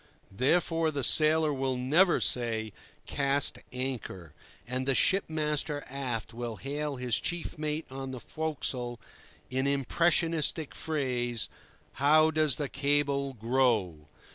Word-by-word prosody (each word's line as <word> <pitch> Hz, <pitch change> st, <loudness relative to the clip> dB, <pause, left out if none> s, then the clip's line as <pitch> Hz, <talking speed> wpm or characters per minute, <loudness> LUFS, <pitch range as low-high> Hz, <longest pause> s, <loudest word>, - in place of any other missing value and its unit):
Therefore 165 Hz, -, +1 dB
the 145 Hz, -3 st, -3 dB
sailor 155 Hz, +2 st, +4 dB
will 130 Hz, -1 st, -2 dB
never 160 Hz, +9 st, +3 dB
say, 110 Hz, -3 st, 0 dB, 0.3 s
"cast 140 Hz, 0 st, +2 dB
anchor," 125 Hz, -, -5 dB, 0.3 s
and 130 Hz, +2 st, -3 dB
the 135 Hz, -, +3 dB
ship 195 Hz, +8 st, +3 dB
master 150 Hz, -2 st, -1 dB
aft 125 Hz, -5 st, -4 dB
will 120 Hz, -1 st, -5 dB
hail 145 Hz, +4 st, -4 dB
his 125 Hz, -2 st, -1 dB
chief 175 Hz, -1 st, -3 dB
mate 155 Hz, +1 st, -3 dB
on 135 Hz, 0 st, -6 dB
the 130 Hz, -1 st, -6 dB
forecastle 130 Hz, -6 st, -3 dB, 0.5 s
in 130 Hz, +1 st, 0 dB
impressionistic 160 Hz, +2 st, +1 dB
phrase: 125 Hz, -6 st, -2 dB, 0.5 s
"How 155 Hz, +2 st, +5 dB
does 155 Hz, -4 st, +3 dB
the 145 Hz, -, -2 dB
cable 140 Hz, 0 st, 0 dB
grow?" 110 Hz, -, 0 dB
140 Hz, 120 wpm, -29 LUFS, 125-155 Hz, 0.5 s, How